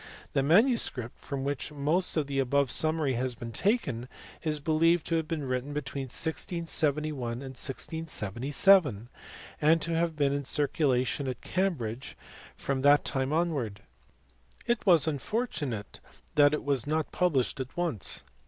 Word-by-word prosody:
The 135 - +2
manuscript, 165 - +2
from 140 -2 -5
which 140 +1 -3
most 150 +6 +1
of 155 - +1
the 140 -1 -2
above 135 0 +2
summary 155 -3 +1
has 125 0 -2
been 115 +1 -7
taken, 140 - 0 0.3
is 155 -2 0
believed 165 +3 +2
to 165 - -1
have 160 -1 -2
been 155 -2 -3
written 130 +2 -3
between 140 -2 -4
1671 155 +1 -1 0.2
and 120 - -6
1677, 140 - +1 0.5
and 160 +2 +4
to 165 0 -1
have 165 -1 0
been 140 -2 +1
in 140 0 -2
circulation 140 -2 +1
at 125 -2 -4
Cambridge 135 - -2 0.4
from 135 -1 -2
that 145 +1 +5
time 135 +1 0
onwards. 145 - -1 0.8
It 235 -1 0
was 170 -5 +6
unfortunate 150 - -3 0.3
that 145 0 +5
it - - -5
was 140 -3 0
not 155 +1 -1
published 145 -9 +1
at 130 +3 -6
once. 165 - 0
145 Hz, 145 wpm, -29 LUFS, 130-165 Hz, 0.8 s, was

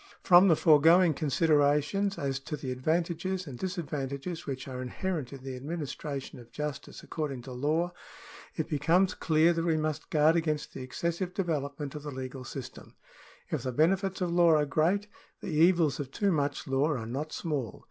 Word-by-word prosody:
From 180 +2 +7
the 165 - +6
foregoing 165 +3 +5
considerations 150 +6 +2
as 135 -1 -2
to 150 +2 -5
the 130 -3 -5
advantages 170 +7 -1
and 135 -5 -8
disadvantages 160 -3 -4
which 130 -1 -4
are 130 -1 -5
inherent 150 +1 -3
in 135 -2 -10
the 135 -1 -5
administration 140 -1 -5
of 120 -1 -14
justice 150 0 -6
according 140 -6 -4
to 130 - -9
law, 155 +7 0 0.6
it - - -2
becomes 165 +6 +2
clear 160 +1 +3
that 165 0 -1
we 165 -2 +2
must 155 -1 -3
guard 155 +1 +4
against 155 -3 -1
the - - -7
excessive 170 +8 -3
development 145 -5 -2
of 150 - -6
the 150 - -6
legal 130 -1 -6
system. 130 0 -9 0.6
If - - -1
the 130 - -3
benefits 185 - +1
of 180 -2 0
law 170 -2 +5
are 150 -1 +3
great, 165 +8 +1 0.3
the - - -6
evils 165 -1 +3
of 140 -3 -4
too 200 +7 0
much 145 -3 -1
law 135 +2 +2
are 130 -8 -2
not 140 +7 -4
small. 140 - -3
150 Hz, 175 wpm, -29 LUFS, 135-170 Hz, 0.6 s, From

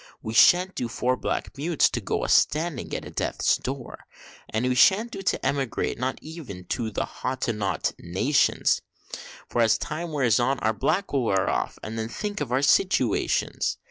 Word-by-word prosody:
We 110 - -4
shan't 180 +9 +5
do 120 - -3
for 125 +2 0
black 130 - -3
mutes 160 +1 +3
to - - -2
go - - -2
a - - -1
standing 155 -3 +1
at - - -5
a - - -9
death's - - 0
door. 130 -1 -7 0.4
And 110 +3 -1
we 125 - +2
shan't 210 - +4
do 195 - -6
to 185 - -1
emigrate, 135 -5 -1
no 130 - 0
not 130 - -5
even 145 - -9
to 115 -2 -1
the 105 - -2
Hottentot 115 -6 -2
nations, 130 - +1 0.7
For 120 - 0
as 115 -2 +4
time 165 +2 -5
wears 125 -6 +2
on, 135 +3 +1
our 110 +1 +1
black 165 - -1
will 135 -4 +1
wear 95 -3 +1
off, - - -1
and 110 +1 -5
then 110 0 -3
think 205 - -4
of 135 -5 -3
our 130 +3 +1
situations! 145 - +1
130 Hz, 185 wpm, -25 LUFS, 115-155 Hz, 0.7 s, shan't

